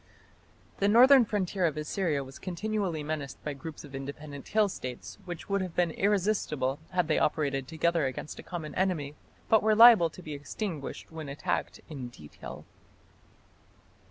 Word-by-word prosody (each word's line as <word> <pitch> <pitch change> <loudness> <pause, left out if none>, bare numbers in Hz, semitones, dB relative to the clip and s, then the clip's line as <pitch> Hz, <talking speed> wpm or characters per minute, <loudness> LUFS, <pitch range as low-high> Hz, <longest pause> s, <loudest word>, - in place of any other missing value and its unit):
The 200 - +3
northern 250 +4 +7
frontier 195 -3 -1
of 155 - -3
Assyria 150 -2 -1
was 135 +1 -11
continually 185 -3 -2
menaced 145 -3 -4
by 150 - -3
groups 155 +3 -8
of 145 - -12
independent 140 +1 -7
hill 215 -1 +3
States 130 -9 -7
which 175 -3 -7
would 200 -1 0
have 185 -3 -5
been 175 -2 +2
irresistible 185 -9 0
had 180 -3 +1
they 155 - +2
operated 140 -3 0
together 165 -1 +1
against 130 +3 -6
a - - -5
common 165 -4 -6
enemy, 170 -7 0 0.3
but 220 - +5
were 215 0 +3
liable 225 -7 +9
to 180 - -13
be 155 - -6
extinguished 145 +2 -5
when 160 -3 -7
attacked 140 - -3
in 135 -5 -6
detail. 75 -11 -11
160 Hz, 155 wpm, -29 LUFS, 145-195 Hz, 0.3 s, liable